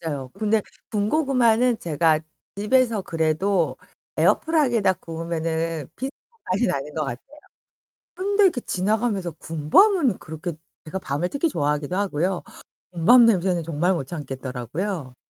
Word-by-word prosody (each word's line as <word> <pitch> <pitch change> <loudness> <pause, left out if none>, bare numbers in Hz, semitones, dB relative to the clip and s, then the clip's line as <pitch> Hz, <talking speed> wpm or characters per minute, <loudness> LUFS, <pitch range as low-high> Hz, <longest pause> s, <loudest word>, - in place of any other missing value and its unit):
맞아요. 145 -6 -4
근데 215 -1 +1 0.3
군고구마는 240 0 +2
제가 160 -1 +2 0.4
집에서 225 0 +2
그래도 165 +2 0 0.4
에어프라이기에다 245 - +3
구우면은 165 -2 -3
비슷한 270 +3 -5 0.3
맛이 200 +7 +2
나는 150 -4 -3
것 155 -2 -1
같아요. 135 - -8 0.8
근데 400 +1 +3
그 260 - -4
지나가면서 200 -2 -1
군밤은 185 - +3
그렇게 160 +3 -6 0.3
제가 185 +5 -4
밤을 155 +1 -2
특히 285 - 0
좋아하기도 150 - -1
하고요. 185 -2 -1 0.5
군밤 235 +9 +6
냄새는 185 -5 +2
정말 165 +3 0
못 150 -6 -3
참겠더라고요. 135 - -5
180 Hz, 325 characters per minute, -23 LUFS, 160-230 Hz, 0.8 s, 군밤